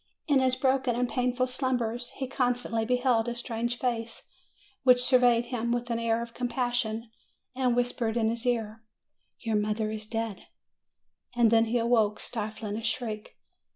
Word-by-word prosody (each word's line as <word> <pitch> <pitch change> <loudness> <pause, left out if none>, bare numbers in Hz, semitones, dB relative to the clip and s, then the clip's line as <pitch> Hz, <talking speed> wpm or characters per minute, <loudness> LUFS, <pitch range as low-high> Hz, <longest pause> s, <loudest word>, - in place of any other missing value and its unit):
In 285 -3 +4
his 260 -1 +2
broken 260 -1 +1
and 250 +1 +1
painful 250 0 0
slumbers 250 -2 -1
he 270 - -2
constantly 245 -3 0
beheld 245 -1 +2
a 240 - -4
strange 240 0 -3
face, 230 -2 -3 0.5
which 250 -1 +6
surveyed 245 -2 +4
him 235 -1 -2
with 240 0 -1
an 230 - 0
air 230 0 +1
of 235 0 -10
com 250 0 -2
passion, 240 -2 -2 0.4
and 255 -2 +1
whispered 240 -2 0
in 220 -1 +2
his 230 0 -2
ear, 225 -3 -1 0.6
"Your 225 -3 0
mother 215 +1 -1
is 215 0 -6
dead!" 225 -2 -4 0.9
And 235 -2 +4
then 225 0 +5
he 230 +2 0
awoke, 225 -3 +2
stifling 215 -1 -4
a - - -4
shriek. 225 -2 -4
235 Hz, 160 wpm, -28 LUFS, 225-250 Hz, 0.9 s, which